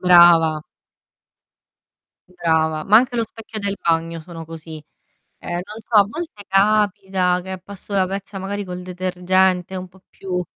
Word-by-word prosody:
Brava. 170 -3 +6 1.8
Brava, 160 -2 +1
ma 210 +2 +6
anche 245 +1 +2
lo 230 - +1
specchio 220 0 -9
del 200 -1 -2
bagno 165 0 0
sono 165 0 -9
così. 160 -1 -9 0.6
Ehm, - - -7
non 195 +5 -5
so, 230 - -2
a 200 - +7
volte 270 -5 -7
capita 195 -2 +2
che 190 -1 -6
passo 200 +2 -10
la 190 -2 +2
pezza, 195 0 -5
magari 200 +2 -3
col 180 0 -6
detergente 185 0 0
un 185 0 -5
po' 190 +1 -21
più 180 -2 -4
185 Hz, 150 wpm, -21 LUFS, 175-200 Hz, 1.8 s, a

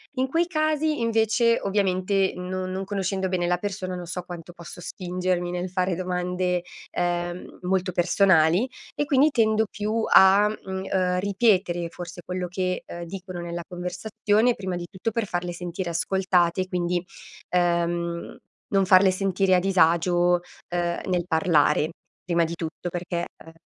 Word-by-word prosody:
In 260 +1 +1
quei 330 +5 +1
casi 310 -3 0
invece, 230 0 +2
ovviamente, 195 -1 +1
no 185 +1 -4
non 190 +1 -3
conoscendo 190 -1 -2
bene 175 -2 0
la 180 0 +2
persona, 185 -1 -4
non 175 -1 -6
so 180 +1 -5
quanto 175 -1 -9
posso 170 0 -11
spingermi 180 -1 -2
nel 180 +1 -3
fare 185 -1 0
domande, 180 0 -1 0.3
ehm, 175 0 -3
molto 185 0 0
personali 180 +3 +3 0.2
e 290 - -1
quindi 280 +2 +4
tendo 220 -3 +2
più 215 +2 -1
a, 195 +2 +7
mhmm, 190 -3 -5
uhm, 180 -1 +1
ripetere 190 -4 +1
forse 175 0 -9
quello 180 -1 -3
che, 185 0 -2
uhm, 170 0 -7
dicono 185 0 -7
nella 170 0 -5
conversazione, 205 +6 0
prima 190 -4 -4
di 175 0 -5
tutto 200 +4 -3
per 230 0 -1
farle 175 -1 -3
sentire 175 0 -4
ascoltate, 185 0 +1
quindi, 175 -1 -1 0.5
uhm, 170 -1 0 0.4
non 195 -1 +4
farle 185 0 +6
sentire 190 0 +2
a - - +4
disagio, 175 -1 +3 0.3
uhm, 175 0 0
nel 180 -2 0
parlare, 160 -2 +3 0.4
prima 170 -1 +2
di 165 - -2
tutto 165 +2 -5
perché, 175 0 -3 0.2
uhm 165 - -13
180 Hz, 150 wpm, -25 LUFS, 175-195 Hz, 0.5 s, a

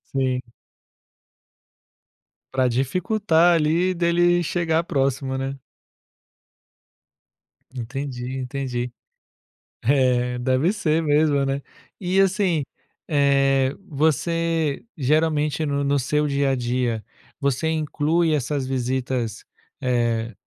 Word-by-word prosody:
Sim. 130 -1 0 2.1
Pra 130 -1 +2
dificultar 170 - +2
ali 170 +4 +2
dele, 175 +1 +3
chegar 165 -1 0
próximo, 135 -3 -1
né. 135 +1 -3 2.2
Entendi, 130 +1 -5
entendi. 125 -2 -3 0.9
É, 125 -1 +2
deve 130 +8 +2
ser 165 -6 +1
mesmo, 145 -2 +3
né. 135 +1 -1 0.4
E 185 0 +1
assim, 190 -5 +2 0.4
eh, 135 -2 +3
você 160 0 0
geralmente 155 +1 +1
no 140 -1 -1
no 140 0 +2
seu 150 +3 0
dia 140 0 +1
a - - +1
dia, 120 -2 -1 0.4
você 140 +2 0
inclui 160 +1 +1
essas 140 -1 -1
visitas, 125 -3 -2 0.4
eh, 120 -3 0
140 Hz, 90 wpm, -23 LUFS, 130-160 Hz, 2.2 s, dele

